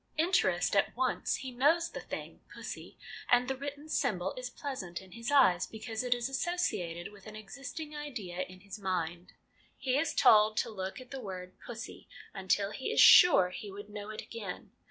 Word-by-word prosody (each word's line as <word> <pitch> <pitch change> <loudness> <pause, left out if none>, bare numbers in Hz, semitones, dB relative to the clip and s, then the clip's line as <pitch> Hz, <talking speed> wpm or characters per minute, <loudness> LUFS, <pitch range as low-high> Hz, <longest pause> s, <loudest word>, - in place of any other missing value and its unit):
Interest 310 - +2
at 200 - +2
once; 255 -1 0
he 260 -1 -6
knows 300 +7 +2
the - - -6
thing, - - -7
pussy, - - -8 0.3
and 245 0 +4
the 270 - -1
written 285 +2 -7
symbol 190 - 0
is 250 -1 -5
pleasant 245 - -5
in 190 -1 -15
his 230 +5 -5
eyes 245 -12 +5
because 220 +1 -5
it 245 -1 +2
is 240 0 -2
associated 235 - -2
with 205 0 -15
an 215 - -9
existing 275 +8 -7
idea 240 -12 -6
in 185 0 -7
his 200 +2 -9
mind. 175 -2 -3 0.4
He 255 -1 0
is 315 0 -1
told 215 -4 +6
to - - 0
look 190 +2 -5
at 255 -1 -13
the 270 -1 -5
word 185 -3 -7
' - - -17
pussy 240 0 -8
' - - -21
until 200 +2 +1
he 260 - -4
is - - +1
sure 280 - +9
he 205 +2 -7
would 205 +1 -9
know 205 0 -7
it 215 - -6
again. 210 -6 -7
220 Hz, 195 wpm, -31 LUFS, 190-270 Hz, 0.4 s, sure